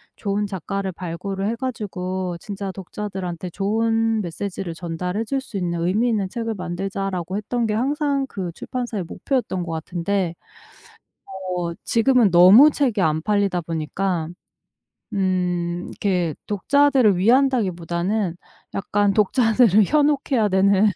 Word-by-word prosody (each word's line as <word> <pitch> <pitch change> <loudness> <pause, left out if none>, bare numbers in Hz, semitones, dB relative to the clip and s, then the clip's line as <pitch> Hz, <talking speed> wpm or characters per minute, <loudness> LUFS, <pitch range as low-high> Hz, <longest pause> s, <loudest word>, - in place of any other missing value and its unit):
좋은 205 0 -1
작가를 195 0 -4
발굴을 190 +3 -4
해 230 - -1
가지고 185 -8 -4
진짜 195 0 -5
독자들한테 185 -2 -5
좋은 225 +3 +1
메시지를 180 0 -5
전달해 180 +5 -3
줄 270 +3 -1
수 215 -7 -7
있는 170 -2 -2
의미 205 +8 +1
있는 205 -5 0
책을 230 0 -3
만들자."라고 185 0 -3
했던 235 +2 -1
게 210 - -1
항상 280 +3 0
그 185 -5 -4
출판사의 240 -5 -4
목표였던 190 - -2
거 165 -1 -5
같은데 175 +2 -2 1.2
어 170 -1 -2
지금은 235 -3 +3
너무 190 - +8
책이 255 -8 0
안 155 -1 +1
팔리다 200 -2 +1
보니까 165 +1 -2 0.9
음 180 -3 -1
이렇게 180 -6 -1
독자들을 260 0 +3
위한다기 245 0 +3
보다는 175 +2 -2 0.4
약간 205 0 +1
독자들을 215 -1 +4
현혹해야 285 -5 +2
되는 200 +2 +4
195 Hz, 295 characters per minute, -22 LUFS, 180-225 Hz, 1.2 s, 너무